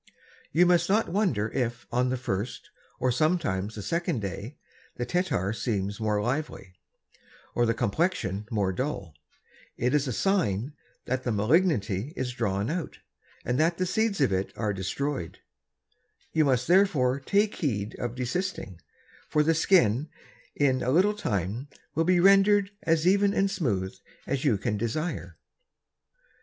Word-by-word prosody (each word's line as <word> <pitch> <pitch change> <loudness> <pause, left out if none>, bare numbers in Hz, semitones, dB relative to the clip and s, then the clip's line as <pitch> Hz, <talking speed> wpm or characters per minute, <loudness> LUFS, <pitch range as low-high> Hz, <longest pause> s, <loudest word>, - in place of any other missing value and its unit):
You 175 +4 +5
must 175 0 +3
not 215 +3 +2
wonder 165 - +1
if 120 -2 -2
on 125 +1 +1
the 130 - -1
first, 110 -1 -4 0.3
and 125 -1 +1
sometimes 120 - 0
the 105 - -6
second 170 - -1
Day, 100 +6 -6 0.4
the 120 - -3
Tettar 125 - 0
seems 100 -2 -2
more 105 -1 0
lively, 120 -5 -3 0.8
or 120 -1 +2
the 115 - +1
Complection 110 - -1
more 100 -4 0
dull; 100 - -3 0.6
it 125 +3 0
is 145 -1 +2
a - - -1
sign 140 - 0 0.3
that 130 0 -1
the 120 - -1
Malignity 110 - +1
is 125 -1 -3
drawn 105 0 -1
out, 170 -1 -4 0.5
and 125 +2 0
that 165 +2 +2
the 185 - 0
Seeds 220 +1 0
of 130 -8 +3
it 95 +1 -1
are 105 -3 -1
destroy'd: 100 - -3 1.0
you 155 -1 +3
must 125 -2 +1
therefore 160 -8 +3
take 200 +9 +1
heed 110 - -2
of 120 -1 -3
desisting, 125 - -3 0.5
for 150 - +3
the 165 +2 +3
Skin 150 - +3 0.5
in 135 -3 +2
a 125 - -1
little 185 +9 +4
Time 110 - -2 0.3
will 165 +2 +1
be 180 0 +4
render'd 195 +1 +5
as 165 0 +1
even 200 +2 +3
and 195 0 +2
smooth 100 - -1 0.3
as 135 -1 -2
you 120 -8 +3
can 105 +2 -2
desire. 120 - -3
130 Hz, 150 wpm, -27 LUFS, 105-170 Hz, 1.0 s, You